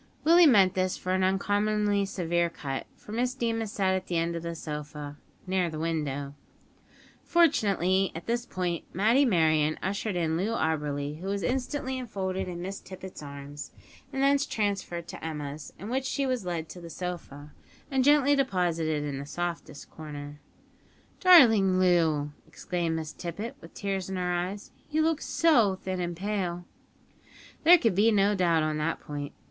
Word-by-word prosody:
Willie 335 +2 +7
meant 195 -8 +5
this 185 0 0
for 185 - -4
an 190 0 +2
uncommonly 205 +1 +1
severe 170 -3 0
cut; 135 -5 -5
for - - -13
Miss 245 +3 -1
Deemas 225 -4 -1
sat 190 -2 +1
at 185 0 -2
the 175 - -1
end 170 +1 0
of 170 - -3
the 170 0 -5
sofa, 150 -2 -6 0.3
near 185 -2 0
the 155 - -6
window! 150 -4 -2 0.9
Fortunately, 195 - +3
at 165 - -7
this 235 +1 -1
point, 180 -5 -2
Matty 230 +9 +4
Merryon 155 -6 +3
ushered 195 +1 -2
in 165 -2 0
Loo 210 +6 -1
Auberly, 150 -3 -1
who 185 - -6
was 200 0 -2
instantly 260 +1 -2
enfolded 190 -6 -3
in 175 -1 -5
Miss 195 +2 -5
Tippet's 185 -2 -10
arms, 140 0 -8 0.4
and 270 -1 -1
thence 280 0 +3
transferred 195 -5 -2
to - - -8
Emma's, 150 -2 -5
in 200 - -8
which 260 +3 -1
she 275 +1 -1
was 250 -8 -2
led 165 -2 -3
to 180 - -9
the 170 - -9
sofa, 160 -5 -7 0.4
and 265 -1 +2
gently 285 0 +5
deposited 170 - 0
in 140 -2 -4
the 140 - -6
softest 175 -3 -5
corner. 145 -1 -8 0.8
"Darling 225 - +7
Loo!" 165 -5 +2 0.2
exclaimed 170 0 -2
Miss 160 -1 -4
Tippet, 210 +9 -6
with - - -14
tears 195 -2 -3
in 190 - -3
her 180 -1 -1
eyes; 185 +4 -3 0.2
"you 310 +1 +1
look 320 -1 +1
so 235 - +3
thin 185 -1 -4
and 175 -1 -3
pale." 180 -3 -2 1.0
There 345 +3 +9
could 230 - +1
be 205 +5 +4
no 205 -1 +3
doubt 170 -5 +2
on 155 0 -1
that 165 +2 -1
point. 145 -1 -6
185 Hz, 170 wpm, -28 LUFS, 160-215 Hz, 1.0 s, There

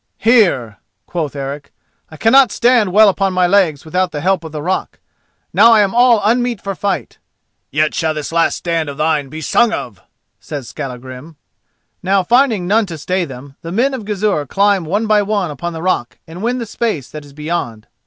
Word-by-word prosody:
"Here," 185 - +2 0.3
quoth 155 -5 -4
Eric; 140 +1 -6 0.4
"I 155 - -12
cannot 255 - +5
stand 240 -5 +2
well 215 +3 +6
upon 195 -1 +1
my 180 0 +2
legs 175 -6 +2
without 180 +2 -1
the 150 - -4
help 185 0 +1
of 160 - -8
the 150 -1 -6
rock. 185 +3 -2 0.6
Now 230 - +6
I 215 - +5
am 195 -2 +1
all 240 -3 +4
unmeet 240 0 +1
for 195 - -4
fight." 200 +1 -3 0.5
"Yet 150 +2 0
shall 160 -1 -1
this 150 0 -5
last 165 0 +2
stand 165 -3 -2
of 140 - -8
thine 150 -2 0
be 155 +3 -7
sung 235 +9 +2
of!" 110 - -6 0.4
says 140 -5 -7
Skallagrim. 130 +4 -8 0.7
Now 190 +1 +1
finding 235 -3 +2
none 210 +3 +2
to 165 -3 -7
stay 180 +4 -1
them, 135 0 -11
the 165 - -7
men 250 +8 +1
of 255 -4 -5
Gizur 205 -8 -1
climb 200 +1 +1
one 205 +8 -1
by 215 -1 +3
one 200 -5 -1
upon 170 +5 -5
the 160 0 -6
rock 180 -10 -1
and 165 +3 -10
win 240 +3 -1
the 235 - -4
space 215 - -3
that 150 -1 -8
is 145 -1 -16
beyond. 150 -8 -4
180 Hz, 195 wpm, -16 LUFS, 150-210 Hz, 0.7 s, well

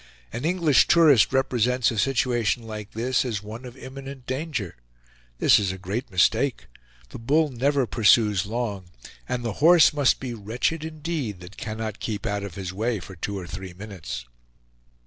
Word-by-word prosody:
An 120 +5 -4
English 165 -5 +3
tourist 155 -9 +5
represents 125 -2 +1
a 110 - -2
situation 120 -2 +1
like 110 -2 -8
this 125 +3 0
as 110 -5 -3
one 110 +4 -8
of 125 +1 -10
imminent 135 0 -9
danger; 130 - -4 0.6
this - - +5
is 100 -3 0
a 95 - -6
great 100 +7 -4
mistake; 115 +8 +2 0.4
the - - -9
bull 150 +7 +2
never 135 +2 +1
pursues 105 -4 +3
long, 105 -4 -3 0.4
and 125 -1 -2
the 115 - -2
horse 165 -1 +7
must 145 -3 +3
be 130 -2 -5
wretched 120 +9 -2
indeed 155 - -4
that 90 +3 -11
cannot 110 -1 -5
keep 105 -3 -4
out 100 0 -1
of 100 -4 -7
his 95 -2 -5
way 110 +2 -1
for 95 +2 -10
two 100 +4 -4
or 95 - -6
three 95 +1 -7
minutes. 85 - -7
115 Hz, 165 wpm, -25 LUFS, 100-135 Hz, 0.6 s, horse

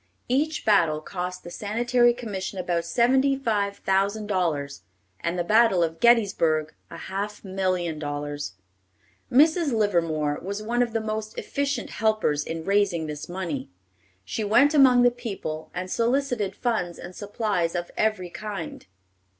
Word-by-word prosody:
Each 300 +5 0
battle 165 -8 +4
cost 180 +2 -5
the 175 - -9
Sanitary 240 +4 +2
Commission 205 -5 -5
about 175 -2 -1
seventy 260 +8 +3
five 205 -6 -1
thousand 200 +3 0
dollars, 160 -8 -1 0.4
and 170 +1 -2
the 175 - 0
battle 215 -2 +4
of 165 0 -2
Gettysburg, 170 -10 +3 0.2
a - - -9
half 200 +2 -5
million 185 -4 -1
dollars. 145 -5 -4 0.8
Mrs. 310 +4 +4
Livermore 165 -9 +1
was 200 +3 -4
one 240 +3 0
of 235 -2 0
the 225 - 0
most 215 0 -4
efficient 280 -3 -2
helpers 215 -10 +1
in 165 +1 -5
raising 195 -5 +2
this 150 0 -6
money. 170 -7 -4 0.6
She 215 - -3
went 245 +8 +4
among 260 -4 +6
the 245 - +5
people, 200 -10 -6
and 185 +1 -5
solicited 235 -5 0
funds 200 -8 -1
and 180 +1 -9
supplies 205 -5 -1
of 175 0 -3
every 215 -5 0
kind. 205 - -6
200 Hz, 140 wpm, -25 LUFS, 170-230 Hz, 0.8 s, among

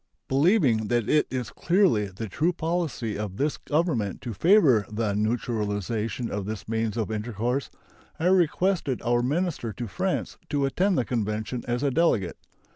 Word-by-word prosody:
Believing 135 - +3
that 120 -1 +1
it 150 - +3
is 125 -4 -3
clearly 175 - +2
the 100 +4 -6
true 160 - +1
policy 160 - -2
of 100 -3 -4
this 145 +2 0
Government 145 - -1
to 120 - -5
favor 150 - +5
the 105 -1 -1
neutralization 110 +1 -1
of 100 -1 -3
this 110 -2 -5
means 110 0 -1
of 110 -1 -1
intercourse, 120 +4 -2 0.5
I 160 - -1
requested 180 -5 +2
our 120 0 +2
minister 145 -2 -1
to 120 - -5
France 180 - -2
to 145 -2 +1
attend 185 +7 +1
the 125 - +1
convention 110 +1 -2
as 120 +2 -1
a 140 - +2
delegate. 125 - +1
120 Hz, 155 wpm, -26 LUFS, 110-155 Hz, 0.5 s, favor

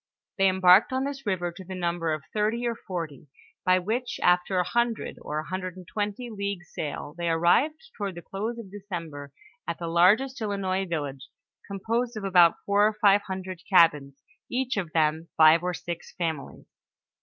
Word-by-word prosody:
They 195 0 +5
embarked 185 +3 +5
on 260 +1 0
this 275 -3 -5
river 175 -3 -1
to 170 +3 -11
the 185 +1 -7
number 170 -2 -1
of 155 -2 -3
thirty 220 +3 0
or 235 - 0
forty, 165 - -6 0.4
by 185 0 +4
which 225 +7 -2
after 180 +1 +3
a 180 - +3
hundred, 235 -1 -1
or 150 - -4
a 155 - -3
hundred 185 +2 -5
and 180 -2 -11
twenty 210 +4 -3
leagues 200 -4 -5
sail, 145 -1 -5
they 170 0 -2
arrived 280 - +2
toward 200 -4 -4
the 170 - -9
close 220 +5 -4
of 215 -5 -9
December, 165 -8 -7 0.4
at 170 - -2
the 170 - -5
largest 205 +11 +3
Ilinois 195 -3 -1
village, 140 -5 -4 0.4
composed 230 +4 -2
of 210 - -5
about 180 -3 +5
four 205 +1 +4
or 215 - -1
five 205 -1 +5
hundred 185 -2 -5
cabins, 150 -6 +4 0.3
each 255 +1 -1
of 190 -5 -2 0.5
five 160 +1 +7
or 180 0 -2
six 170 0 -7
families. 160 -5 -4
185 Hz, 175 wpm, -26 LUFS, 170-210 Hz, 0.5 s, five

